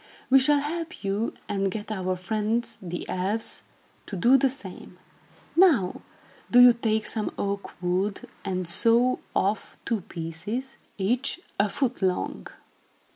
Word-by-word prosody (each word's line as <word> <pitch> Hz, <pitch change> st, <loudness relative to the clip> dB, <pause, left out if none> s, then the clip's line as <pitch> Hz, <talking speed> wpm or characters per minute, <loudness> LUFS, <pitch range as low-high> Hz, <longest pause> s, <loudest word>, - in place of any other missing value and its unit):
"We 270 Hz, -, +8 dB
shall 285 Hz, +2 st, +4 dB
help 330 Hz, +2 st, -5 dB
you 200 Hz, +3 st, -1 dB
and 195 Hz, -1 st, 0 dB
get 210 Hz, +2 st, -5 dB
our 185 Hz, -3 st, -1 dB
friends, 215 Hz, +5 st, -2 dB
the 175 Hz, -2 st, -5 dB
elves, 195 Hz, +5 st, -1 dB, 0.5 s
to 200 Hz, -, -5 dB
do 235 Hz, +9 st, +5 dB
the 270 Hz, 0 st, +4 dB
same. 195 Hz, -8 st, -9 dB, 0.6 s
Now, 305 Hz, -, +4 dB, 0.5 s
do 245 Hz, -, +6 dB
you 245 Hz, -1 st, +9 dB
take 220 Hz, -2 st, 0 dB
some 215 Hz, 0 st, 0 dB
oak 200 Hz, -2 st, -4 dB
wood 185 Hz, +3 st, 0 dB, 0.2 s
and 185 Hz, -2 st, -2 dB
saw 235 Hz, +7 st, +4 dB, 0.2 s
off 200 Hz, +3 st, 0 dB
two 225 Hz, -3 st, 0 dB
pieces, 175 Hz, +11 st, -5 dB, 0.2 s
each 245 Hz, -, 0 dB, 0.2 s
a 200 Hz, +1 st, +3 dB
foot 250 Hz, +3 st, -1 dB
long. 185 Hz, -1 st, -1 dB
215 Hz, 135 wpm, -26 LUFS, 190-245 Hz, 0.6 s, you